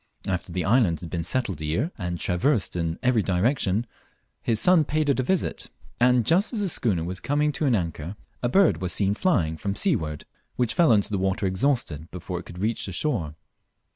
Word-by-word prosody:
After 90 -3 -3
the 90 -3 -2
island 100 - +3
had 85 - -8
been 85 -2 -2
settled 95 - -1
a - - -3
year, 105 - -1
and 90 -3 -4
traversed 95 +5 0
in 85 -1 -2
every 125 -3 +3
direction, 100 +2 +1 0.6
his 115 -2 +1
son 180 +1 +5
paid 150 0 0
it 135 - +2
a - - +4
visit; 185 +8 -1 0.3
and 125 -1 +4
just 185 +6 +3
as 220 - -1
the 195 - 0
schooner 105 - 0
was 90 +2 -4
coming 150 +1 +1
to 150 +1 -1
an 125 - +3
anchor, 85 -1 -3 0.3
a 120 - 0
bird 195 - +3
was 90 -1 -1
seen 100 -1 +1
flying 95 - +1
from 100 +3 -3
seaward 80 - 0 0.3
which 120 -3 0
fell 170 -7 +4
into 105 -1 +3
the 100 - 0
water 95 +1 0
exhausted 95 - -1
before 90 0 -5
it 90 - -11
could 85 - -10
reach 110 +4 -1
the - - -5
shore. 90 - -2
100 Hz, 205 wpm, -25 LUFS, 90-130 Hz, 0.6 s, son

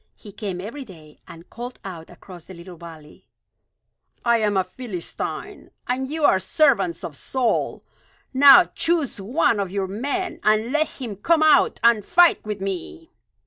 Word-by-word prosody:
He 205 - -13
came 195 -3 -6
every 230 +9 -7
day 160 - -16
and 165 +1 -13
called 245 +2 -8
out 170 -4 -9
across 175 0 -14
the 190 - -12
little 175 +1 -12
valley: 160 -2 -14 1.0
"I 235 0 +4
am 210 -2 0
a 190 - +2
Philistine, 185 -2 -7 0.2
and 260 +1 -2
you 315 +1 -4
are 190 - +4
servants 310 - +1
of - - -7
Saul. 255 -3 -1 0.5
Now 280 +6 +8
choose 320 -11 0
one 240 +2 +1
of 195 -2 -2
your 195 +1 -2
men, 280 - -4
and 215 +3 +1
let 310 +1 +1
him 230 -7 -8
come 320 - +2
out 310 - +4
and 235 -3 +4
fight 350 - +4
with 210 -2 -6
me. 195 - -6
215 Hz, 160 wpm, -22 LUFS, 190-285 Hz, 1.0 s, Now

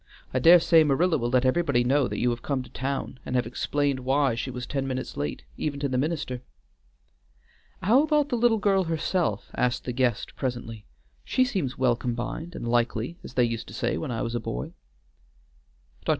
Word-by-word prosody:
I 130 - +2
dare 170 +7 +8
say 165 -1 +5
Marilla 155 +3 +2
will 120 0 -1
let 130 +1 +2
everybody 135 -2 +2
know 135 +1 +2
that - - -4
you 120 - +2
have 120 0 -4
come 135 -1 -2
to 125 - -15
town, 135 -1 -3
and 125 - -4
have 125 - +2
explained 140 +3 -1
why 135 0 +2
she 115 +3 -3
was 125 -1 -5
ten 135 -2 -2
minutes 130 -1 -4
late, 70 -3 -3
even 145 -2 -2
to 140 - 0
the 130 - -2
minister." 140 -4 -2 1.4
"How 230 +9 +5
about 300 -1 +2
the 250 - 0
little 235 -1 +3
girl 195 -3 +2
herself?" 160 - -1
asked 125 0 0
the 125 - -3
guest 120 -4 0
presently; 120 -4 -4 0.4
"she 255 - +2
seems 180 - -2
well 125 -2 +3
combined, 125 +8 -4
and - - -5
likely, 120 +6 0
as - - -10
they 125 - +4
used 115 -1 -2
to - - -9
say - - 0
when 80 - -4
I 120 0 -2
was 115 -1 -3
a 120 - 0
boy." 60 - -5 1.3
Dr. - - -5
130 Hz, 200 wpm, -26 LUFS, 120-160 Hz, 1.4 s, dare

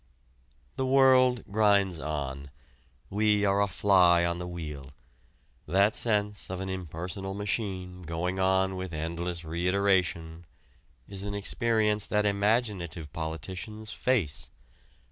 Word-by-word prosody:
The 130 - 0
world 130 -2 +5
grinds 100 -4 +3
on: 70 -3 -4 0.6
we 105 0 +2
are 100 0 +2
a 100 - +2
fly 90 -3 +4
on 85 0 -1
the 90 - -5
wheel. 75 -6 -7 0.7
That 100 +3 +3
sense 105 -3 0
of 95 0 -4
an 95 0 -4
impersonal 95 +2 -5
machine 95 -3 -3
going 90 +3 -3
on 95 0 +2
with 95 -2 -5
endless 85 +2 -4
reiteration 85 -1 0 0.6
is 100 -1 -6
an 100 0 -4
experience 105 0 +1
that 105 0 +1
imaginative 100 - 0
politicians 95 +7 -6
face. 90 - -1
95 Hz, 115 wpm, -28 LUFS, 85-105 Hz, 0.7 s, world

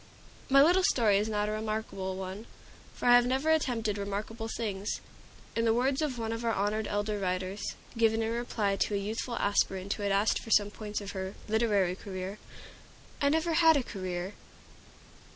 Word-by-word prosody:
My 275 +1 +7
little 355 +5 +5
story 220 - +3
is 215 +2 -1
not 210 -1 0
a - - -1
remarkable 215 -3 -3
one, 190 +4 -6 0.5
for - - -2
I 245 - +8
have 245 0 +6
never 265 +5 +1
attempted 230 -9 0
remarkable 210 +3 -4
things. 210 -3 -3 0.6
In 230 - +1
the 225 -1 +3
words 265 +4 +1
of 285 -5 -1
one 225 -1 -3
of 230 +1 -4
our 230 -1 +1
honored 210 +2 0
elder 205 0 -1
writers, 185 +1 -2 0.3
given 225 -1 +2
in 225 - -1
reply 225 -4 -1
to 205 - 0
a - - +2
youthful 220 +4 -3
aspirant 195 -1 +1
who - - -8
had 200 -1 0
asked 200 +3 +2
for - - -10
some 205 -2 +4
points 210 0 -5
of 200 -1 -6
her 190 0 -5
"literary 210 -5 +2
career," 190 +1 -6 0.8
"I 280 - +4
never 320 +2 +1
had 320 -1 +6
a 270 - 0
career." 185 -3 -4
215 Hz, 185 wpm, -30 LUFS, 200-235 Hz, 0.8 s, I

